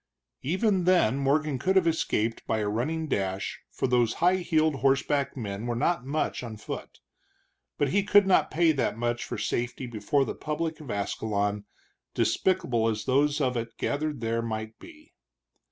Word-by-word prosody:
Even 185 - +1
then 175 -10 +4
Morgan 140 0 +1
could 190 +8 +1
have 190 -3 +5
escaped 115 -9 0
by 110 - +1
a 105 -1 -1
running 145 +10 -1
dash, 95 -6 -2
for - - -2
those 120 -3 +2
high 180 +2 +3
heeled 160 -4 +1
horseback 135 +2 +1
men 105 -1 -4
were 120 - -1
not 130 +1 0
much 155 +3 -1
on 115 -3 -7
foot. 105 - -7 0.8
But 145 - +1
he 200 +8 +3
could 205 0 +5
not 190 - +3
pay 165 0 +3
that 130 -7 -1
much 120 0 -1
for - - -5
safety 120 +2 -2
before 120 +4 0
the - - -3
public 160 +1 -3
of 150 -4 -10
Ascalon, 105 0 -1 0.5
despicable 125 -12 +1
as 110 -1 -2
those 145 +3 +2
of 130 -3 +1
it 115 -1 -4
gathered 145 -2 -2
there 115 0 0
might 110 -1 -5
be. 310 -2 -15
135 Hz, 170 wpm, -27 LUFS, 115-160 Hz, 0.8 s, have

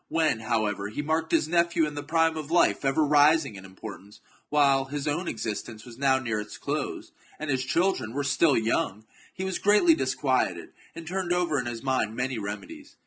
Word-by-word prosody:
When, 160 -8 +1
however, 110 -3 -1
he 145 +8 -4
marked 160 +2 -1
chap. - - +4
his 155 - -2
nephew 170 0 +2
in 150 - -5
the 145 - -4
prime 165 +2 +1
of 155 -2 -6
life 170 -2 +3
ever 135 +3 +2
rising 150 -2 +4
in 95 -1 -10
import 95 +2 -9
ance, 105 +2 -17 0.3
while 140 -2 +3
his 145 +2 -4
own 165 +5 -1
existence 110 0 -5
was 120 0 -12
now 135 -1 +3
near 115 -5 -2
its 105 0 -7
close, - - -4 0.3
and 155 -1 -3
his 130 -1 0
children 165 -6 0
were 145 +1 -1
still 140 +1 +3
young, 110 -2 -1 0.3
he 190 - -4
was 190 -1 -2
greatly 210 - +5
disquieted, 325 - -1 0.2
and 165 - -8
turned 180 +1 -3
over 175 -5 +1
in 120 - -4
his 120 0 -5
mind 130 -5 0
many 125 -1 -2
reme 105 0 -5
dies. 300 -2 -13
145 Hz, 205 wpm, -27 LUFS, 115-165 Hz, 0.3 s, greatly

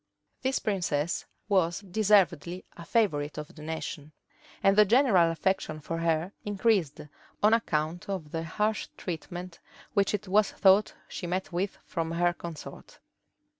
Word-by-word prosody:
This 260 +1 +1
princess 170 -6 -1 0.2
was 185 -4 +2
deservedly 185 -4 +2
a 170 - -10
favorite 155 -11 +1
of 150 0 -7
the 155 - -12
nation; 155 -1 -5 0.5
and 195 0 +5
the 210 - +8
general 210 -6 +4
affection 165 -1 -1
for 165 +2 -4
her 165 +2 0
increased, 205 -6 +1 0.4
on 215 +1 +6
account 170 -5 0
of 175 -7 -4
the 165 - -2
harsh 210 +6 -1
treatment 175 +1 -6 0.3
which 200 0 +2
it 205 0 -6
was 205 +2 +3
thought 195 +2 +4
she 175 - -6
met 185 +2 -2
with 185 +3 -2
from 165 -1 -3
her 175 +1 +2
consort. 170 -3 -9
175 Hz, 140 wpm, -28 LUFS, 165-200 Hz, 0.5 s, the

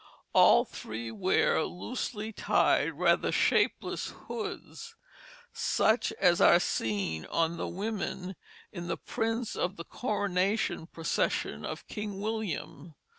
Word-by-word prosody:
All - - +7
three 115 +1 -6
wear 185 - +2
loosely 220 +2 -4
tied - - +2
rather - - +2
shapeless - - +1 0.2
hoods, 435 -1 -6 0.6
such 220 +2 +2
as 175 -3 +3
are 175 - +7
seen 100 - -1
on 165 +1 0
the - - -3
women 195 -1 -4 0.4
in 175 -3 -6
the - - -2
prints 225 +1 -2
of 180 +2 -1
the 170 - -8
coronation 200 -5 -1
procession 160 - -1
of 155 - -6
King 210 -2 -5
William. 200 -7 -4
185 Hz, 115 wpm, -30 LUFS, 165-215 Hz, 0.6 s, All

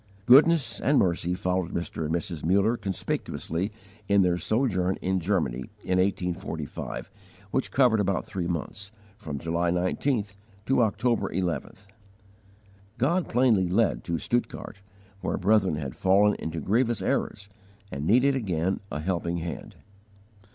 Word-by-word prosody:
Goodness 140 -1 +5
and 140 +3 +3
mercy 90 0 +1
followed 90 -1 -1
Mr. 85 -1 -3
and 80 - 0
Mrs. 85 -2 -4
Muller 100 +7 +3
conspicuously 95 -2 -3 0.4
in 100 -1 +4
their 90 -1 +1
sojourn 95 -6 +1
in 95 0 0
Germany 85 -9 -1 0.2
in 90 0 +1
1845, 90 -4 -3 0.4
which 135 - 0
covered 125 -5 +3
about 100 -1 0
three 90 -3 -3
months, 95 +3 -4 0.3
from 80 -9 -6
July 85 +3 -1
19th 100 +4 -1 0.3
to 135 -1 +3
October 110 -1 +1
11th. 90 +2 -3 1.1
God 165 +9 +1
plainly 115 -7 +3
led 100 +5 +1
to 85 -1 -1
Stuttgart, 110 0 -3 0.4
where - - -2
brethren 100 -3 +3
had 70 -4 -5
fallen 100 +2 +4
into 80 0 -4
grievous 115 - +1
errors 100 +1 -1 0.4
and 70 +3 -4
needed 130 +5 +4
again 95 -7 -1
a 75 - -3
helping 85 0 -1
hand. 85 -1 -6
95 Hz, 130 wpm, -27 LUFS, 85-110 Hz, 1.1 s, Goodness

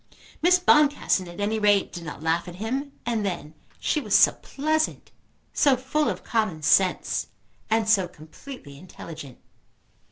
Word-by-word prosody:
Miss 360 +3 +5
Boncassen 295 - +3
at 175 +2 -11
any 215 +2 0
rate 205 -2 +2
did 175 - -7
not 150 0 -8
laugh 165 +2 0
at 175 - -8
him. 260 +8 -3
And 230 -3 -1
then 170 -6 -4 0.3
she 300 - 0
was - - 0
so - - +7
pleasant, 310 +2 -2 0.4
so 275 -3 +4
full 280 +4 0
of - - -5
common 215 -9 -1
sense, 185 +4 +2 0.4
and 220 -1 +1
so 200 -5 +3
completely 155 - -12
intelligent! 160 -6 -10
210 Hz, 150 wpm, -25 LUFS, 170-270 Hz, 0.4 s, so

